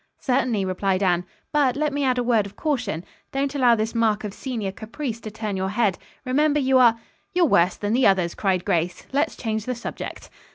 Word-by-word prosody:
"Certainly," 250 Hz, -6 st, 0 dB
replied 190 Hz, +1 st, 0 dB
Anne. 180 Hz, -1 st, +2 dB, 0.3 s
"But 280 Hz, -4 st, +3 dB
let 300 Hz, 0 st, 0 dB
me 285 Hz, 0 st, -1 dB
add 255 Hz, -2 st, +2 dB
a 245 Hz, -, +1 dB
word 230 Hz, -4 st, +2 dB
of 200 Hz, -, -15 dB
caution. 240 Hz, -, -2 dB, 0.3 s
Don't 275 Hz, +1 st, -1 dB
allow 250 Hz, -4 st, +4 dB
this 220 Hz, 0 st, -2 dB
mark 220 Hz, -2 st, +1 dB
of 205 Hz, -2 st, -5 dB
senior 225 Hz, -7 st, -4 dB
caprice 230 Hz, +4 st, -5 dB
to 220 Hz, -, -7 dB
turn 215 Hz, -1 st, -4 dB
your 190 Hz, 0 st, -1 dB
head. 205 Hz, -3 st, +1 dB, 0.3 s
Remember 295 Hz, +3 st, +2 dB
you 265 Hz, -1 st, +4 dB
are 230 Hz, -2 st, +5 dB, 0.2 s
" -, -, -42 dB
"You're 360 Hz, -1 st, +5 dB
worse 180 Hz, -, +3 dB
than 205 Hz, +1 st, -1 dB
the 255 Hz, +2 st, +4 dB
others," 185 Hz, -3 st, +2 dB
cried 185 Hz, -3 st, 0 dB
Grace, 175 Hz, +1 st, -1 dB
"Let's 290 Hz, +3 st, +1 dB
change 220 Hz, -2 st, -3 dB
the 250 Hz, -, -2 dB
subject." 235 Hz, -, -7 dB
230 Hz, 210 wpm, -24 LUFS, 195-265 Hz, 0.3 s, are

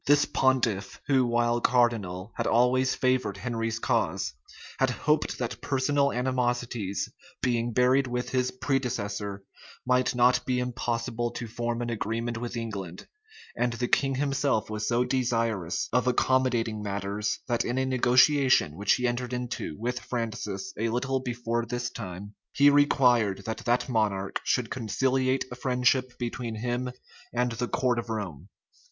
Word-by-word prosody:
This 145 Hz, +1 st, +5 dB
pontiff, 120 Hz, -7 st, +1 dB
who 130 Hz, -3 st, +3 dB
while 120 Hz, 0 st, +1 dB
cardinal, 115 Hz, -6 st, +1 dB
had -, -, -1 dB
always 125 Hz, +2 st, +3 dB
favored 130 Hz, -6 st, +1 dB
Henry's 115 Hz, 0 st, -2 dB
cause, 115 Hz, -, 0 dB, 0.5 s
had 135 Hz, -, +3 dB
hoped 150 Hz, +5 st, 0 dB
that 120 Hz, -1 st, -4 dB
personal 140 Hz, +1 st, +1 dB
animosities 120 Hz, -5 st, -1 dB, 0.4 s
being 120 Hz, -1 st, +1 dB
buried 130 Hz, +3 st, +3 dB
with 125 Hz, 0 st, -2 dB
his 125 Hz, -1 st, +1 dB
predecessor, 105 Hz, -7 st, -2 dB, 0.4 s
might 125 Hz, 0 st, +2 dB
not 125 Hz, +1 st, +4 dB
be 125 Hz, -1 st, 0 dB
impossible 120 Hz, -1 st, -2 dB
to 120 Hz, -, -5 dB
form 120 Hz, +1 st, -3 dB
an 120 Hz, -, -3 dB
agreement 115 Hz, +1 st, -2 dB
with 120 Hz, 0 st, -4 dB
England: 100 Hz, -6 st, -5 dB, 0.5 s
and 120 Hz, 0 st, 0 dB
the 120 Hz, +1 st, -2 dB
king 135 Hz, +1 st, +2 dB
himself 135 Hz, -5 st, 0 dB
was 105 Hz, 0 st, -2 dB
so 120 Hz, +1 st, +2 dB
desirous 115 Hz, -9 st, 0 dB
of 125 Hz, 0 st, +2 dB
accommodating 120 Hz, -3 st, +1 dB
matters, 100 Hz, +1 st, -2 dB
that 120 Hz, -2 st, +1 dB
in 120 Hz, -, -2 dB
a 130 Hz, -, +1 dB
negotiation 130 Hz, -, +4 dB
which 100 Hz, +3 st, +2 dB
he 125 Hz, -, 0 dB
entered 120 Hz, +1 st, -2 dB
into 125 Hz, -10 st, -4 dB
with 120 Hz, +2 st, -2 dB
Francis 110 Hz, -5 st, -4 dB
a 115 Hz, +1 st, +1 dB
little 130 Hz, +3 st, 0 dB
before 120 Hz, -2 st, -2 dB
this 120 Hz, +1 st, -3 dB
time, 100 Hz, -1 st, -7 dB, 0.2 s
he 145 Hz, +1 st, +6 dB
required 125 Hz, -8 st, +3 dB
that 110 Hz, -, -3 dB
that 120 Hz, +1 st, +2 dB
monarch 105 Hz, -5 st, 0 dB
should 125 Hz, -3 st, 0 dB
conciliate 130 Hz, +3 st, 0 dB
a -, -, -5 dB
friendship 125 Hz, 0 st, +1 dB
between 120 Hz, -1 st, -4 dB
him 120 Hz, +3 st, -2 dB, 0.4 s
and 125 Hz, 0 st, +1 dB
the 120 Hz, +1 st, -2 dB
court 125 Hz, -1 st, +1 dB
of 115 Hz, -, -6 dB
Rome. 100 Hz, -10 st, -5 dB
120 Hz, 145 wpm, -27 LUFS, 115-130 Hz, 0.5 s, he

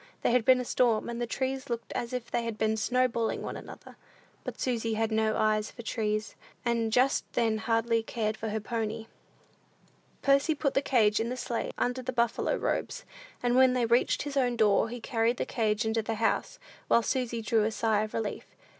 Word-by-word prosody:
There -, -, +3 dB
had 240 Hz, -2 st, +2 dB
been 255 Hz, -1 st, +6 dB
a 250 Hz, -, -3 dB
storm, 235 Hz, -2 st, +1 dB
and 235 Hz, 0 st, -4 dB
the 240 Hz, -, -1 dB
trees 265 Hz, +2 st, -3 dB
looked 235 Hz, -1 st, -4 dB
as 235 Hz, -, -3 dB
if 250 Hz, -2 st, -5 dB
they 240 Hz, -, 0 dB
had 230 Hz, -2 st, -4 dB
been 220 Hz, 0 st, +1 dB
snowballing 235 Hz, 0 st, 0 dB
one -, -, -5 dB
another; -, -, -11 dB, 0.5 s
but -, -, -6 dB
Susy 230 Hz, -3 st, -1 dB
had 220 Hz, 0 st, 0 dB
no 220 Hz, 0 st, +1 dB
eye 215 Hz, 0 st, +2 dB
for 235 Hz, +3 st, -9 dB
trees, 215 Hz, -1 st, -2 dB, 0.3 s
and 230 Hz, -2 st, +1 dB
just 255 Hz, +4 st, +3 dB
then 225 Hz, -2 st, +1 dB
hardly 230 Hz, +1 st, +1 dB
cared 220 Hz, -1 st, -2 dB
for 220 Hz, 0 st, -4 dB
her 220 Hz, +1 st, -1 dB
pony. 225 Hz, 0 st, -3 dB, 1.2 s
Percy 275 Hz, +3 st, +3 dB
put 280 Hz, -2 st, 0 dB
the 275 Hz, -, +2 dB
cage 220 Hz, -6 st, +3 dB
in 225 Hz, +1 st, -1 dB
the 250 Hz, -, -4 dB
sleigh, 240 Hz, -1 st, -3 dB
under 250 Hz, +1 st, -1 dB
the 255 Hz, -, -3 dB
buffalo 235 Hz, -2 st, +1 dB
robes; -, -, -2 dB, 0.4 s
and 245 Hz, 0 st, +2 dB
when 260 Hz, 0 st, +6 dB
they 250 Hz, -2 st, +1 dB
reached 235 Hz, +2 st, +2 dB
his 290 Hz, -1 st, -5 dB
own 250 Hz, -3 st, +2 dB
door, 215 Hz, 0 st, +3 dB
he 245 Hz, +1 st, -6 dB
carried 230 Hz, 0 st, 0 dB
the -, -, -1 dB
cage 215 Hz, -2 st, 0 dB
into 220 Hz, 0 st, +1 dB
the 220 Hz, +1 st, -3 dB
house, 225 Hz, +1 st, 0 dB, 0.3 s
while 235 Hz, -, +4 dB
Susy 240 Hz, -2 st, -1 dB
drew 220 Hz, -1 st, +2 dB
a 215 Hz, -, +1 dB
sigh 220 Hz, -1 st, +1 dB
of 215 Hz, 0 st, -4 dB
relief. 220 Hz, -2 st, -4 dB
230 Hz, 205 wpm, -29 LUFS, 220-250 Hz, 1.2 s, been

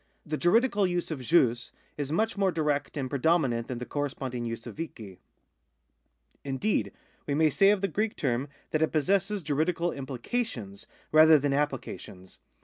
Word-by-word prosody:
The 155 Hz, -, -2 dB
juridical 205 Hz, +4 st, +3 dB
use 175 Hz, -1 st, -2 dB
of 145 Hz, -4 st, -4 dB
jus 125 Hz, -4 st, +2 dB, 0.2 s
is 145 Hz, -1 st, -4 dB
much 220 Hz, +7 st, +1 dB
more 195 Hz, -2 st, +2 dB
direct 150 Hz, -3 st, -1 dB
and 135 Hz, -2 st, -2 dB
pre 140 Hz, +1 st, -3 dB
dominant 135 Hz, -7 st, +2 dB
than 125 Hz, -, -4 dB
the 125 Hz, -, -5 dB
corresponding 130 Hz, -4 st, -3 dB
use 115 Hz, 0 st, -5 dB
of -, -, -9 dB
cikt]. 110 Hz, -, -7 dB, 1.2 s
Indeed, 140 Hz, +10 st, -1 dB, 0.4 s
we 140 Hz, -, 0 dB
may 155 Hz, 0 st, +3 dB
say 195 Hz, +6 st, +5 dB
of 205 Hz, -2 st, +3 dB
the 195 Hz, -, +1 dB
Greek 210 Hz, +5 st, -1 dB
term 130 Hz, -1 st, -1 dB, 0.2 s
that 155 Hz, -, 0 dB
it 160 Hz, -, +2 dB
possesses 195 Hz, +5 st, +1 dB
juridical 160 Hz, +4 st, 0 dB
implications, 125 Hz, -, -4 dB, 0.2 s
rather 155 Hz, 0 st, +8 dB
than 145 Hz, 0 st, 0 dB
apphca 140 Hz, -2 st, -1 dB
tions. 95 Hz, 0 st, -13 dB
150 Hz, 165 wpm, -28 LUFS, 130-175 Hz, 1.2 s, rather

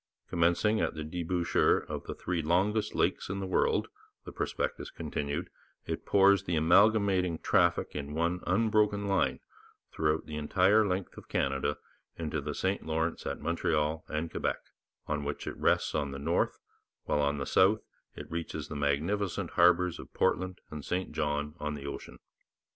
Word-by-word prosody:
'Commencing 85 Hz, +6 st, +2 dB
at -, -, -1 dB
the 80 Hz, -, -4 dB
debouchere 85 Hz, +2 st, +1 dB
of -, -, -5 dB
the -, -, -5 dB
three 85 Hz, -2 st, -2 dB
longest 95 Hz, +7 st, +1 dB
lakes -, -, 0 dB
in 100 Hz, +1 st, -2 dB
the 95 Hz, -, -3 dB
world,' 95 Hz, -, +1 dB, 0.4 s
the -, -, -7 dB
prospectus -, -, -3 dB
continued, 70 Hz, 0 st, -4 dB, 0.3 s
'it -, -, -4 dB
pours 100 Hz, 0 st, +5 dB
the 90 Hz, -, 0 dB
accumulating 95 Hz, +1 st, +4 dB
traffic -, -, +2 dB
in 75 Hz, 0 st, -4 dB
one 85 Hz, +2 st, 0 dB
unbroken 105 Hz, +1 st, +2 dB
line 80 Hz, -9 st, +1 dB, 0.5 s
throughout 80 Hz, 0 st, 0 dB
the 75 Hz, -, -6 dB
entire 95 Hz, +8 st, +4 dB
length 95 Hz, 0 st, -3 dB
of -, -, -16 dB
Canada 70 Hz, 0 st, 0 dB, 0.4 s
into 80 Hz, -2 st, -2 dB
the 75 Hz, +1 st, -4 dB
St 95 Hz, +1 st, -1 dB
Lawrence 80 Hz, +1 st, -2 dB
at -, -, -4 dB
Montreal 80 Hz, -1 st, 0 dB
and 80 Hz, +2 st, -3 dB
Quebec, -, -, -1 dB, 0.5 s
on 75 Hz, -1 st, -2 dB
which 70 Hz, 0 st, -4 dB
it -, -, -4 dB
rests -, -, +1 dB
on 70 Hz, -, 0 dB
the 70 Hz, -, -6 dB
north, 70 Hz, -, 0 dB, 0.5 s
while 75 Hz, -, +1 dB
on 70 Hz, 0 st, +1 dB
the 70 Hz, -, -3 dB
south 100 Hz, +8 st, +4 dB, 0.3 s
it -, -, -7 dB
reaches 80 Hz, -2 st, -4 dB
the 75 Hz, -, -5 dB
magnificent 80 Hz, +8 st, -1 dB
harbours 90 Hz, 0 st, +4 dB
of -, -, -10 dB
Portland 95 Hz, 0 st, 0 dB
and 75 Hz, -2 st, -6 dB
St 90 Hz, +1 st, -2 dB
John 75 Hz, -1 st, -1 dB
on 75 Hz, 0 st, -3 dB
the 70 Hz, -1 st, -8 dB
ocean.' 70 Hz, -, -7 dB
85 Hz, 165 wpm, -30 LUFS, 75-95 Hz, 0.5 s, pours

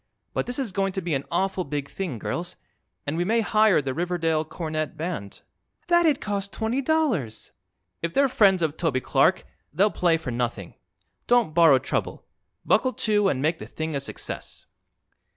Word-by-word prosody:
"But -, -, -2 dB
this 245 Hz, -, -3 dB
is 260 Hz, -7 st, -2 dB
going 195 Hz, 0 st, -1 dB
to 190 Hz, -, -2 dB
be 170 Hz, -2 st, -1 dB
an 135 Hz, 0 st, -1 dB
awful 190 Hz, +2 st, 0 dB
big 145 Hz, -2 st, -4 dB
thing, 165 Hz, -4 st, -4 dB
girls, 175 Hz, -, -4 dB, 0.5 s
and 145 Hz, -, -2 dB
we 175 Hz, -, +1 dB
may 225 Hz, +5 st, +2 dB
hire 215 Hz, -7 st, +3 dB
the 135 Hz, -1 st, -2 dB
Riverdale 165 Hz, -1 st, 0 dB
Cornet 155 Hz, -1 st, -4 dB
Band." 155 Hz, -, -5 dB, 0.5 s
"That'd 340 Hz, -5 st, +4 dB
cost 200 Hz, -1 st, -3 dB
twenty 225 Hz, +5 st, -1 dB
dollars." 250 Hz, -, -1 dB, 0.5 s
"If 170 Hz, -, -2 dB
they're 275 Hz, +9 st, +3 dB
friends 195 Hz, -8 st, +4 dB
of 155 Hz, -1 st, -1 dB
Toby 160 Hz, -7 st, 0 dB
Clark -, -, +2 dB, 0.3 s
they'll 205 Hz, +3 st, +3 dB
play 170 Hz, -2 st, +2 dB
for 160 Hz, -6 st, -5 dB
nothing. 120 Hz, -6 st, -3 dB, 0.5 s
Don't 240 Hz, -9 st, +3 dB
borrow 165 Hz, -5 st, +6 dB
trouble. -, -, -3 dB, 0.4 s
Buckle 255 Hz, -1 st, +3 dB
to, 210 Hz, -2 st, +2 dB
and 135 Hz, -4 st, -1 dB
make 160 Hz, +2 st, +1 dB
the -, -, -8 dB
thing 160 Hz, -1 st, -4 dB
a -, -, 0 dB
success." 140 Hz, -, -7 dB
175 Hz, 170 wpm, -25 LUFS, 155-210 Hz, 0.5 s, borrow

